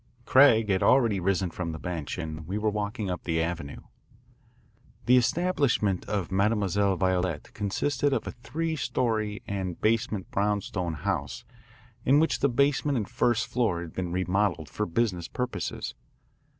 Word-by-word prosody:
Craig 115 -5 +6
had 95 -1 +2
already 115 -7 +4
risen 95 -1 0
from 85 -1 -4
the - - -5
bench 85 -1 -4
and 80 -2 -6
we 95 +4 -2
were 105 0 +1
walking 105 -1 -3
up 90 - -4
the 80 -2 0
Avenue. 80 -3 -3 1.2
The 125 - +6
establishment 125 - +1
of 100 -5 -2
Mademoiselle 100 -1 +2
Violette 90 -4 -1
consisted 130 +7 0
of 130 -5 0
a - - -4
three 160 +7 -3
story 110 -7 -1
and 95 -3 -3
basement 110 -3 0
brownstone 100 -4 -1
house 75 - -3 0.6
in 140 +3 +5
which 160 - +1
the 140 - +3
basement 140 +2 +2
and 105 - -2
first 120 -2 +1
floor 115 -9 0
had 85 -2 -8
been 90 -2 -3
remodelled 90 -2 0
for 105 - -2
business 90 -2 0
purposes. 125 -7 -4
105 Hz, 150 wpm, -27 LUFS, 90-120 Hz, 1.2 s, Craig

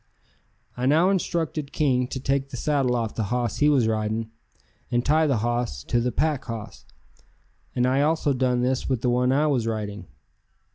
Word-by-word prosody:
I 125 +1 -1
now 165 +7 +4
instructed 165 -6 -2
King 130 -4 +1
to 130 - -5
take 135 +1 -1
the 125 - -7
saddle 135 -3 +1
off 115 -3 -2
the 110 - -2
hoss 120 +3 -1
he 150 - +4
was 130 -6 +3
riding 110 +1 -1 0.6
and 120 0 0
tie 155 +2 +3
the 135 -4 +2
hoss 120 - -2
to 120 - 0
the 125 +1 0
pack 150 -1 0
hoss, 115 -3 -8 0.9
and 125 -1 +2
I 130 +2 +2
also 150 -1 +2
done 125 -1 +1
this 130 +1 0
with 130 -4 0
the 125 - +1
one 125 +1 +2
I 145 +3 +3
was 130 -7 +1
riding. 105 -4 -4
125 Hz, 185 wpm, -25 LUFS, 120-145 Hz, 0.9 s, now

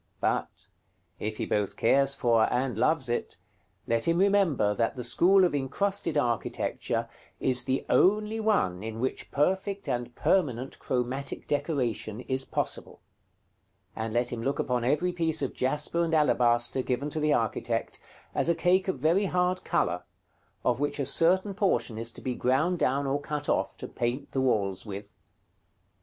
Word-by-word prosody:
But, - - -2 0.5
if 110 0 -4
he - - -2
both 105 -2 -1
cares 140 +3 +3
for 115 -3 +2
and 125 0 0
loves 135 +4 +2
it, 120 - -3 0.5
let 115 +6 0
him 165 0 +3
remember 185 - +3
that 115 +4 0
the 125 - -5
school 185 +10 +4
of 175 - 0
incrusted 155 +4 -1
architecture 120 -5 -1 0.3
is 130 -1 +2
the 130 0 -1
only 210 +3 +3
one 200 - +1
in 110 +1 -6
which 130 +2 -3
perfect 190 +6 0
and 120 -1 -3
permanent 135 -9 0
chromatic 130 +2 -3
decoration 125 -7 -2
is 130 +1 -1
possible; - - -4 0.9
and 110 0 -3
let 120 +2 0
him 115 - -4
look 135 +4 -1
upon 125 -2 -1
every 150 +8 +1
piece 165 -4 0
of 135 - -2
jasper 150 +6 0
and 165 -1 +1
alabaster 120 -4 +2
given 130 +4 -2
to 155 - -2
the 150 0 +2
architect 115 -2 -1 0.3
as - - +1
a 170 - +3
cake 185 +3 +2
of 190 - -1
very 165 +9 +2
hard 180 0 0
color, 90 0 0 0.6
of - - +2
which 145 0 -1
a 140 - -1
certain 185 +8 +3
portion 120 - 0
is 115 +1 -2
to - - -11
be 130 - -2
ground 145 +9 +1
down 140 +2 +1
or 140 +1 -1
cut 150 0 -4
off, - - 0
to - - -7
paint 125 +4 -3
the 135 - 0
walls 100 -7 0
with. 100 -1 -8
135 Hz, 165 wpm, -28 LUFS, 120-170 Hz, 0.9 s, school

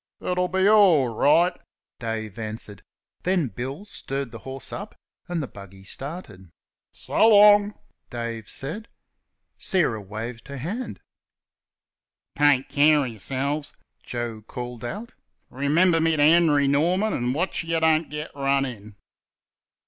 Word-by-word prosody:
"It'll 180 0 0
be 190 +2 +2
orl 190 - +5
right," 155 +10 +3 0.5
Dave 110 -2 -4
answered; 110 -2 -5 0.4
then 180 -7 +1
Bill 135 - -6
stirred 135 - -5
the 115 - -9
horse 135 -1 -7
up, - - -7 0.3
and 175 -3 -2
the - - -5
buggy 95 -2 -13
started. 105 - -8 0.4
"So 220 - +2
long!" 205 -1 +6 0.3
Dave 115 -3 -5
said. 175 +12 -5 0.7
Sarah 165 - +1
waved 115 +5 -7
her 140 0 -7
hand. 200 - -5 1.3
"Take 145 -3 +3
care 150 0 +4
of 125 - -4
y'selves," 140 +7 -3 0.3
Joe 120 -2 -5
called 120 +1 -7
out; 210 - -6 0.4
"remember 160 +6 +3
me 165 0 +2
to 145 - +4
Henry 155 -3 +5
Norman, 175 +10 +2
and 125 +1 -1
watch 175 +2 -1
you 165 0 0
don't 160 0 +2
get 150 +1 -6
run 140 -1 +1
in!" 105 -5 -9
140 Hz, 130 wpm, -24 LUFS, 120-170 Hz, 1.3 s, long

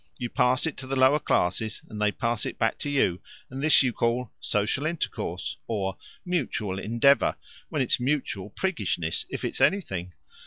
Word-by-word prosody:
You 120 -1 -4
pass 125 +2 +3
it 160 - -2
to 130 - -7
the 135 - -1
lower 130 +3 +5
classes, 110 - 0
and 105 -1 -7
they 105 -1 +3
pass 115 +1 -1
it - - -6
back 110 - 0
to 145 - -3
you, 100 -10 +1 0.3
and 135 +1 -5
this 150 -1 +6
you 125 -2 +1
call 120 +1 0
'social 105 +8 0
intercourse' 165 0 -3
or 95 -4 -1 0.3
'mutual 110 - -1
endeavour,' 120 +7 +3 0.3
when 150 -5 +1
it's 125 - +1
mutual 125 -7 -1
priggishness 100 - -1
if - - -4
it's - - -3
anything. 95 - +1
120 Hz, 170 wpm, -27 LUFS, 105-140 Hz, 0.3 s, this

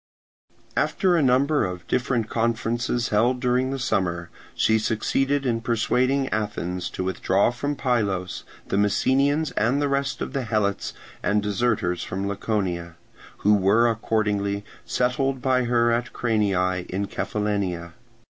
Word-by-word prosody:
After 185 -3 +2
a 165 - +3
number 140 +3 +3
of 90 -2 -4
different 125 -3 0
conferences 115 +1 -1
held 120 +4 +2
during 125 +1 +1
the 135 - -2
summer, 90 -8 -1 0.2
she 110 0 +3
succeeded 135 +6 0
in 115 -2 0
persuading 125 +4 +1
Athens 100 -4 -2
to - - -4
withdraw 95 +3 +1
from 145 +4 -3
Pylos 105 -9 -1 0.2
the - - -1
Messenians 135 +9 +2
and 120 +6 +1
the 145 - +1
rest 140 0 -1
of - - -4
the 135 - -1
Helots 105 -3 -1 0.3
and 105 0 +1
deserters 105 -5 0
from 95 +2 -3
Laconia, 95 -5 -2 0.5
who 105 - +6
were 105 +4 +4
accordingly 105 -3 0 0.2
settled 130 +2 0
by 130 -1 +1
her 120 -1 +3
at 120 0 -1
Cranii 95 -6 0
in 100 +2 -2
Cephallenia. 100 -4 -2
110 Hz, 135 wpm, -24 LUFS, 100-125 Hz, 0.5 s, who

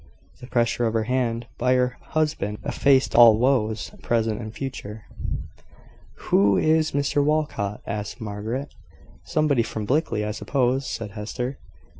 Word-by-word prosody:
The 125 - -10
pressure 120 -1 +1
of 110 - -2
her 110 - +2
hand 120 -1 -1
by 125 +1 +3
her 125 0 +1
husband 150 -10 -1
effaced 135 -2 +3
all 115 -3 +8
woes, 110 -4 +1
present 115 -1 0
and 110 -1 -6
future. 110 -4 -6 1.3
"Who 100 -1 +5
is 155 0 +2
Mr 145 0 +1
Walcot?" 145 -9 -1
asked 105 +3 -4
Margaret. 110 +6 -4 0.5
"Somebody 150 -5 +2
from 110 -2 -4
Blickley, 120 -5 0
I 105 - -2
suppose," 130 +3 0
said 110 -3 -5
Hester. 125 +5 -5
120 Hz, 135 wpm, -24 LUFS, 110-135 Hz, 1.3 s, all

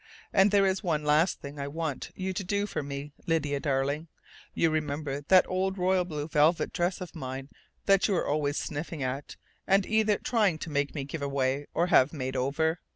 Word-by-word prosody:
And 195 +1 +5
there 200 -1 +4
is 190 0 +1
one 155 -5 0
last 150 +4 +2
thing 145 +1 -8
I 140 - -3
want 155 -2 -4
you 190 0 -3
to 195 - -3
do 200 +2 0
for 205 - -3
me, 140 +1 -6 0.2
Lydia 150 -4 +1
darling. 140 +3 -1 0.5
You 165 - +3
remember 145 -2 -2
that 185 -1 +6
old 190 +1 -1
royal 185 0 +2
blue 150 -4 -4
velvet 155 +2 +2
dress 175 +1 -1
of 180 - -7
mine 135 -2 -6 0.4
that 195 -1 +4
you 200 - +1
were - - 0
always 145 0 0
sniffing 150 0 -4
at 130 +3 -4 0.3
and 195 0 +4
either 215 -1 +2
trying 210 -9 +1
to 155 - -6
make 145 0 -1
me 140 - -2
give 145 +3 -6
away 140 0 -1
or 170 - +3
have 145 -5 +4
made 130 -3 -4
over? 160 +6 0
155 Hz, 200 wpm, -28 LUFS, 140-185 Hz, 0.5 s, that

